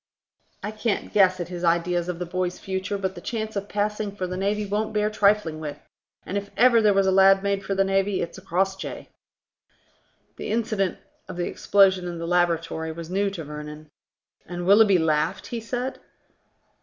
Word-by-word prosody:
I 210 - -3
can't 215 0 -2
guess 185 -2 +4
at 175 -1 -4
his 175 -1 -6
ideas 170 +1 +1
of 180 - -3
the 180 - -4
boy's 180 +1 -2
future, 190 +1 -3
but 190 -1 -2
the 175 - -10
chance 220 +1 -4
of 200 0 -4
passing 210 0 -2
for 185 - -3
the 185 0 -4
navy 205 +3 -1
won't 210 +2 -2
bear 210 0 +1
trifling 205 -6 +2
with, 150 -2 -5 0.5
and 200 - -1
if 200 0 -11
ever 240 -2 +6
there 210 -2 +4
was 195 0 +3
a 190 - +3
lad 195 +1 +6
made 200 -1 0
for 195 - -2
the 195 - +3
navy, 195 0 +1
it's 170 +2 -4
Crossjay." 190 +1 -2 1.3
The - - -5
incident 215 -4 0 0.3
of 185 - -7
the 175 - -1
explosion 190 -3 +3
in 175 -1 -5
the 165 - -4
laboratory 165 -2 0
was 165 +1 -8
new 200 +2 +1
to 185 -4 -6
Vernon. 150 0 -9 0.6
"And 175 0 -5
Willoughby 200 0 +6
laughed?" 160 +3 0
he 235 - -4
said. 245 +3 -4
190 Hz, 185 wpm, -24 LUFS, 175-205 Hz, 1.3 s, ever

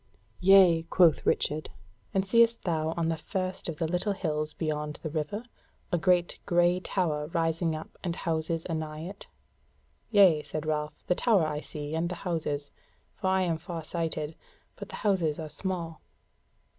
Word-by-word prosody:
"Yea," 185 -3 +7
quoth 165 -1 +3
Richard; 155 +1 +1 0.4
"and 190 0 +1
seest 230 +2 +4
thou 160 -2 0
on 165 -1 +1
the 165 - 0
first 185 +1 -3
of 160 - -4
the 165 -1 0
little 180 +5 0
hills 155 -5 -2
beyond 150 -1 -3
the 155 - -3
river, 155 +8 -3 0.5
a 175 - +3
great 180 -1 +2
grey 175 +1 +3
tower 155 -6 -1
rising 165 0 0
up 155 - -9
and 175 -3 -2
houses 165 -1 -2
anigh 155 -2 -4
it?" 190 +4 -8 0.8
"Yea," 190 -8 +6
said 155 0 -5
Ralph, 150 -1 -2
"the - - +3
tower 200 -3 +3
I 150 -1 -2
see, 150 0 -6
and 165 +2 0
the 180 - -3
houses, 150 -4 -2 0.4
for 190 - -3
I 190 0 +3
am 165 -3 0
far 165 -1 -6
sighted; 160 -1 -3 0.4
but - - -8
the - - -7
houses 175 -7 +2
are 155 -1 -5
small." 170 -1 -4
165 Hz, 165 wpm, -29 LUFS, 155-185 Hz, 0.8 s, Yea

